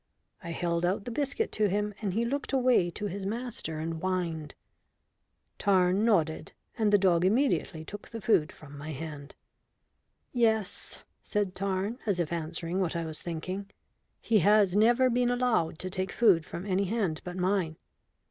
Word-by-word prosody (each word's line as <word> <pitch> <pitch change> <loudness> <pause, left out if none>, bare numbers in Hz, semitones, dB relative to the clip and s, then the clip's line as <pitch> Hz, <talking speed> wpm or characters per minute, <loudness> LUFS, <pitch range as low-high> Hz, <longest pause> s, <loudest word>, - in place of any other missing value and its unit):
I 170 - -6
held 170 0 -1
out 185 +3 0
the 245 - -4
biscuit 285 - -1
to 210 -1 +2
him, 210 +2 -1
and 195 -4 -2
he 230 +1 +1
looked 280 +3 -3
away 250 -9 +3
to 205 +5 -5
his 200 0 -4
master 215 -6 -3
and 160 +1 -3
whined. 170 -5 -2 1.0
Tarn 190 0 +3
nodded, 165 -9 +1 0.2
and 215 -3 +2
the 205 - +7
dog 180 -3 +3
immediately 185 - +1
took 205 +4 -9
the 230 - -6
food 190 -6 +2
from 145 -5 -13
my 150 +2 -6
hand. 145 -1 -7 1.0
"Yes," 220 -5 +1 0.2
said 205 -3 -1
Tarn, 195 +5 -2
as 195 -4 +1
if 170 -1 -1
answering 170 +2 -3
what 180 -3 0
I 170 -1 -1
was 160 -1 -4
thinking, 185 +4 -5 0.5
"he 225 -2 +3
has 205 0 +4
never 240 +5 +5
been 245 0 +2
allowed 245 -11 +1
to 185 - -3
take 185 0 -2
food 190 -9 +4
from 175 - -6
any 195 0 +1
hand 195 -6 -1
but 180 0 -6
mine. 180 -3 0
190 Hz, 165 wpm, -29 LUFS, 170-220 Hz, 1.0 s, the